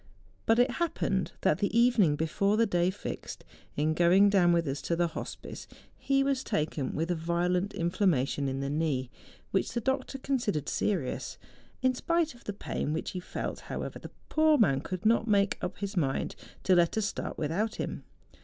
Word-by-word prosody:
But 225 - +5
it 245 +1 +4
happened 240 - -1
that 155 - +2
the 205 +2 0
evening 230 -11 +4
before 200 +7 +1
the 230 - +4
day 175 -3 +2
fixed, 185 - -6 0.3
in 155 +2 +1
going 180 +5 +5
down 180 -3 +5
with 170 -2 +2
us 135 +1 -2
to 170 - -1
the 170 0 +1
hospice, - - -7 0.3
he 275 0 +1
was 275 -1 0
taken 150 -3 -2
with 165 +3 -1
a - - +1
violent 175 +4 0
inflammation 165 -6 +1
in 135 +1 -3
the 140 - -2
knee, 145 -5 -1 0.4
which 190 - 0
the 240 - 0
doctor 265 +2 -1
consid¬ 255 - -1
ered 145 - -12
serious. 170 -11 -1 0.5
In 255 0 +4
spite 335 +4 0
of 240 - -19
the - - -2
pain 155 -6 -3
which 160 - -3
he 185 - -4
felt, 180 - -5
however, - - -4
the - - -9 0.2
poor 310 -1 +4
man 140 - +3
could 185 +4 -5
not 230 +1 +3
make 200 -2 +2
up 180 +1 -3
his 200 0 -4
mind 135 -7 0 0.3
to 190 - +4
let 175 +3 +3
us 220 - +1
start - - -4
without 190 +9 -1
him. - - -4
185 Hz, 190 wpm, -29 LUFS, 160-225 Hz, 0.5 s, But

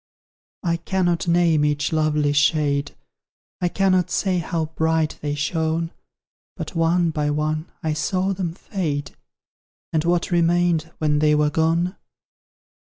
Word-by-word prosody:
I 170 -2 +1
cannot 175 0 0
name 170 -3 +3
each 150 +1 0
lovely 150 -2 +1
shade; 145 -1 +1 0.7
I 180 - +2
cannot 185 -1 +2
say 185 -3 0
how 165 -1 -2
bright 160 -1 0
they 145 -1 -2
shone; 160 +2 -1 0.7
But - - -6
one 165 0 +2
by 150 -1 -1
one, 155 +2 -2
I 155 -1 0
saw 185 +5 0
them 175 -3 -3
fade; 155 -8 -3 0.8
And 155 -1 +2
what 170 +1 0
remained 170 -1 +2
when 150 -1 +1
they 150 0 +4
were 150 0 +2
gone? 165 +4 +1
160 Hz, 130 wpm, -22 LUFS, 150-175 Hz, 0.8 s, they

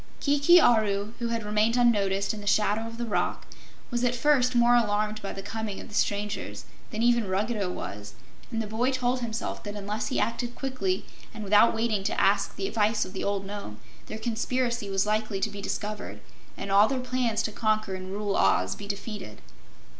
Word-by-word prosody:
Kiki 290 +5 +5
Aru, 215 -5 +3
who 235 - -1
had 230 -1 -2
remained 215 +3 +2
unnoticed 200 -5 +2
in 210 - -7
the 205 - -9
shadow 215 +2 +2
of 230 0 -8
the 240 - -2
rock, 220 - -1 0.5
was 240 0 -1
at 245 0 +2
first 255 -1 +3
more 240 0 +5
alarmed 215 -2 +1
by 195 - -4
the 195 - -7
coming 215 -1 -4
of - - -10
the - - -13
strangers 205 0 -2 0.2
than 220 0 -2
even 235 -3 +3
Ruggedo 200 +1 -1
was, 105 - -6 0.4
and 225 -2 -2
the - - -5
boy 225 +4 0
told 255 -1 0
himself 230 -1 -4
that 205 0 -6
unless 205 +2 -3
he 265 - -1
acted 240 +1 -1
quickly 225 -9 -2 0.3
and 215 - -6
without 210 +3 +5
waiting 220 -3 0
to - - 0
ask - - +2
the 390 - -2
advice 215 - +1
of 185 - -10
the 190 - -4
old 200 -1 -1
Nome, 200 - -7 0.3
their 215 - -5
conspiracy 235 0 -1
was 195 0 +1
likely 215 -1 0
to - - -1
be 200 - -7
discovered 210 +1 -4 0.4
and 195 0 -5
all 200 +2 +6
their 265 +1 -1
plans 250 -3 0
to 215 - -2
conquer 215 -2 0
and 185 0 -6
rule 205 0 -1
Oz - - +3
be 200 - -9
defeated. 200 - -6
215 Hz, 200 wpm, -27 LUFS, 205-235 Hz, 0.5 s, all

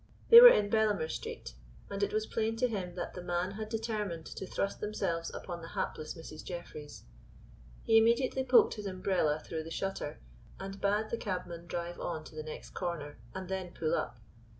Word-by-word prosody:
They 465 0 +13
were - - +14
in 205 - +3
Bellamer 210 -7 +2
Street, - - -6 0.3
and 200 0 -4
it 200 - +1
was 215 0 0
plain 225 0 -1
to 250 +2 +2
him 185 -6 -4
that 175 - -4
the 180 - -6
men 175 +1 -1
had 215 +2 -6
determined 215 -7 -3
to 190 - -7
thrust 200 - -2
themselves 170 -6 -2
upon 175 -2 -6
the 165 - -8
hapless 155 +3 -3
Mrs. 160 -2 -9
Jeffreys. 170 -4 -8 0.8
He 225 0 +6
immediately 240 +4 +2
poked 250 -1 +6
his 210 -2 -5
umbrella 185 -5 +1
through 160 +1 -5
the 160 - -8
shutter, 195 -4 -3 0.4
and 195 +1 -7
bade 210 +2 +1
the 235 - 0
cabman 175 -3 -4
drive 175 0 -4
on 160 -3 -3
to 155 - -13
the 155 - -4
next 155 0 -8
corner, 160 -7 -4 0.2
and 190 -1 -5
then 190 -1 -4
pull 155 - 0
up. 120 0 -1
185 Hz, 190 wpm, -32 LUFS, 165-215 Hz, 0.8 s, were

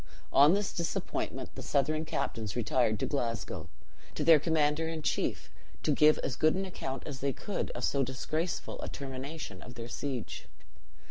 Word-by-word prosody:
On 145 +6 +8
this 205 0 -1
disappointment 170 -3 -2
the - - -7
Southron 155 +3 +1
captains 110 -8 -2
retired 115 -2 +2
to - - +1
Glasgow, 115 -6 -2 0.5
to - - -1
their 165 -2 +8
commander 155 0 +2
in 160 -1 -4
chief, - - -1 0.3
to - - +2
give 150 +2 +6
as 125 - -1
good 155 +2 +4
an 195 +1 -1
account 135 -8 -5
as 140 -3 -5
they 140 0 0
could 205 - -3
of - - -4
so 140 - +2
disgraceful 155 +6 -2
a - - -4
termination 135 - -6
of 120 - -10
their 115 -1 -6
siege. 125 0 -4
145 Hz, 170 wpm, -31 LUFS, 125-160 Hz, 0.5 s, On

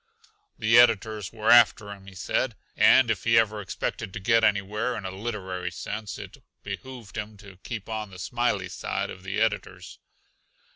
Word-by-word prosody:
The 115 +2 +5
editors 110 -4 +3
were 110 0 +1
after 110 -3 +5
him, 100 -1 -11
he 95 - -12
said, 115 +5 -1 0.2
and 125 -3 +6
if 100 -4 -2
he 115 0 +4
ever 110 -2 +2
expected 95 0 -4
to 110 - -5
get 115 +3 +3
anywhere, 105 +4 +1
in 105 - -7
a 95 - -3
literary 95 -3 -4
sense, 100 +4 -6
it - - -10 0.3
be 100 -1 -4
hooved 120 -2 -11
him 105 0 -5
to 100 -3 -14
keep 110 -2 -6
on 110 -2 -4
the 95 - -12
smiley 105 -1 -1
side - - -3
of 90 - -10
the 95 +2 -3
editors. 110 -2 -2
105 Hz, 180 wpm, -26 LUFS, 95-115 Hz, 0.3 s, and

